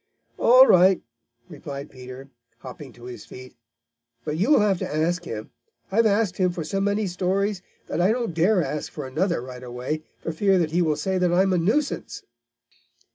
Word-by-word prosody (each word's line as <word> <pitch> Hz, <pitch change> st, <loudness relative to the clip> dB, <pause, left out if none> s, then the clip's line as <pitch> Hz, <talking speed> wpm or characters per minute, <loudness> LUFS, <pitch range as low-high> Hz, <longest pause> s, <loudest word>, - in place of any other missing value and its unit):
"All 255 Hz, +3 st, +8 dB
right," 185 Hz, -3 st, +5 dB, 0.5 s
replied 140 Hz, -1 st, -8 dB
Peter, 130 Hz, +1 st, -11 dB, 0.3 s
hopping 130 Hz, +1 st, -10 dB
to 120 Hz, -, -17 dB
his 125 Hz, 0 st, -8 dB
feet. 130 Hz, 0 st, -12 dB, 0.7 s
"But 150 Hz, -, -2 dB
you'll 215 Hz, -, +4 dB
have 200 Hz, -3 st, +2 dB
to -, -, -4 dB
ask 170 Hz, +3 st, 0 dB
him. 110 Hz, -5 st, -6 dB, 0.4 s
I've 225 Hz, +3 st, +4 dB
asked 205 Hz, -3 st, +1 dB
him 185 Hz, -1 st, +2 dB
for 170 Hz, -, -4 dB
so 195 Hz, +6 st, -2 dB
many 205 Hz, +2 st, 0 dB
stories 190 Hz, +2 st, -1 dB, 0.2 s
that -, -, -2 dB
I 185 Hz, +4 st, +4 dB
don't 235 Hz, -5 st, -2 dB
dare 175 Hz, +3 st, +3 dB
ask 150 Hz, 0 st, -4 dB
for 150 Hz, -, -6 dB
another 165 Hz, +3 st, -1 dB
right 125 Hz, -1 st, -9 dB
away, 125 Hz, +5 st, -4 dB, 0.2 s
for -, -, -2 dB
fear 195 Hz, +4 st, +2 dB
that 165 Hz, -3 st, 0 dB
he 175 Hz, +2 st, +2 dB
will 155 Hz, -3 st, +1 dB
say 185 Hz, +5 st, -1 dB
that 180 Hz, -1 st, +2 dB
I 180 Hz, +2 st, +4 dB
am 190 Hz, -1 st, +1 dB
a 180 Hz, -, +2 dB
nuisance." 250 Hz, -, -1 dB
175 Hz, 185 wpm, -24 LUFS, 145-195 Hz, 0.7 s, All